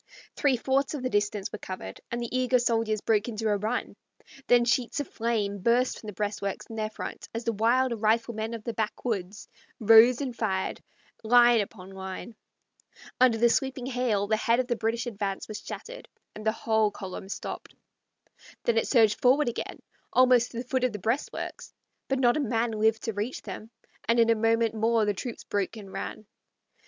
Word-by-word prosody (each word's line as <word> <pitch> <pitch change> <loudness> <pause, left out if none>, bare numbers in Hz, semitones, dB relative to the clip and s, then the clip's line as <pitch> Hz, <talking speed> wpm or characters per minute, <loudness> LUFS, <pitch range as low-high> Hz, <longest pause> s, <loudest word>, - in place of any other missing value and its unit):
Three 275 -3 +2
fourths 270 +4 0
of 270 - -5
the 255 - -1
distance 205 -1 0
were 215 - -6
covered, 185 - -7
and 235 - -3
the 240 +1 -4
eager 255 0 +3
soldiers 225 -3 0
broke 215 -1 +1
into 220 -1 -2
a 205 - +3
run; 220 +5 -3 0.5
then 240 -1 +5
sheets 240 +3 +1
of 290 - -3
flame 215 -3 -1
burst 240 +5 +2
from 215 - -11
the 210 - -5
breastworks 205 0 -3
in - - -6
their 215 -1 -2
front 215 - -7
as 230 - -3
the 230 - 0
wild 240 +4 +2
riflemen 225 0 0
of 225 - -8
the 235 - -3
backwoods 210 -2 -3 0.3
rose 225 +3 +7
and 265 -4 -3
fired, 190 -5 -2 0.4
line 240 0 +6
upon 195 -2 -8
line. 190 +4 -7 0.9
Under 250 -3 +5
the 235 +2 +5
sweeping 260 +1 0
hail 245 -6 0
the 215 +1 +1
head 230 +2 +2
of 255 - +1
the 240 -1 -1
British 230 +1 -1
advance 200 -4 -3
was 215 -1 -6
shattered, - - -8 0.3
and 215 +1 -6
the - - +5
whole 220 -1 +1
column 190 -1 -8
stopped. - - -6 0.9
Then 230 -1 +3
it - - -2
surged 220 -5 +4
forward 260 +2 +4
again, 235 - -6 0.3
almost 250 -1 +5
to 235 - -9
the 240 - -2
foot 260 -1 0
of 250 -3 +1
the - - -3
breastworks; 225 +8 -3 0.3
but 270 - 0
not 245 0 +3
a - - 0
man 230 -3 0
lived 220 0 +1
to 225 - -2
reach 210 +6 -4
them, 220 - -8 0.4
and 230 +1 +3
in 230 0 +5
a - - +4
moment 225 0 +2
more 225 0 +2
the 205 - +1
troops 230 +4 -6
broke 205 +2 -2
and 195 -3 -10
ran - - -5
back. - - -25
225 Hz, 195 wpm, -27 LUFS, 215-245 Hz, 0.9 s, rose